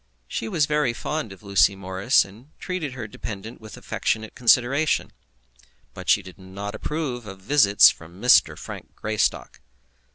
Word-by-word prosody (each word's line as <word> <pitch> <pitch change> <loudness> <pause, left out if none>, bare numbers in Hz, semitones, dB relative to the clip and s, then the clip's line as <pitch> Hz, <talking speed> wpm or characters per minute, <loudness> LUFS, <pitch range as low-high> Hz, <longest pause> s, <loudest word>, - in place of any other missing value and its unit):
She 115 - -4
was 150 +5 +1
very 150 -4 +1
fond 150 -1 -4
of 95 +1 -13
Lucy 100 0 +3
Morris, 95 +6 +2
and 110 +8 -16
treated 180 -7 -4
her 125 -3 -6
dependent 110 +1 -8
with 110 -1 -11
affectionate 110 0 -2
consideration; 130 +5 +2 0.8
but - - -8
she 100 - +4
did 95 0 -13
not 100 +2 -7
approve 130 -7 -4
of 95 -1 -9
visits 105 -2 +6
from 85 +3 -14
Mr. 125 +3 +5
Frank - - -10
Greystock. 110 0 -1
110 Hz, 150 wpm, -24 LUFS, 100-135 Hz, 0.8 s, visits